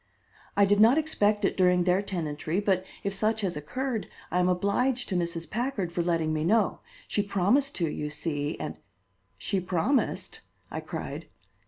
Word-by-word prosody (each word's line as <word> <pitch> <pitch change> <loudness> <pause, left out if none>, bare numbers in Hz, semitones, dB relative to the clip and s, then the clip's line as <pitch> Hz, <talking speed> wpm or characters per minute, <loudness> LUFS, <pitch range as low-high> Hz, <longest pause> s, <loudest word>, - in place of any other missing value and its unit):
"I 200 - +7
did 205 +1 +3
not 230 +6 +7
expect 210 -10 +2
it - - +1
during 180 -1 +4
their 180 +2 +3
tenantry, 165 -3 -2
but 195 -3 +1 0.2
if 200 - -1
such 215 +2 +1
has 185 -5 -1
occurred, 230 - -3 0.2
I 180 - +2
am 180 0 +3
obliged 235 +8 +1
to 190 - -1
Mrs. 170 -1 -2
Packard 220 - -2
for 170 - -1
letting 165 -2 +1
me 155 0 0
know. 210 +4 +2 0.3
She 205 - +1
promised 205 +8 +2
to, 170 - 0
you 150 0 -3
see, 150 0 -2
and - - -5 0.3
" - - -43
"She 195 - +2
promised!" 185 - 0 0.3
I - - -3
cried. - - -6
190 Hz, 175 wpm, -28 LUFS, 170-215 Hz, 0.3 s, I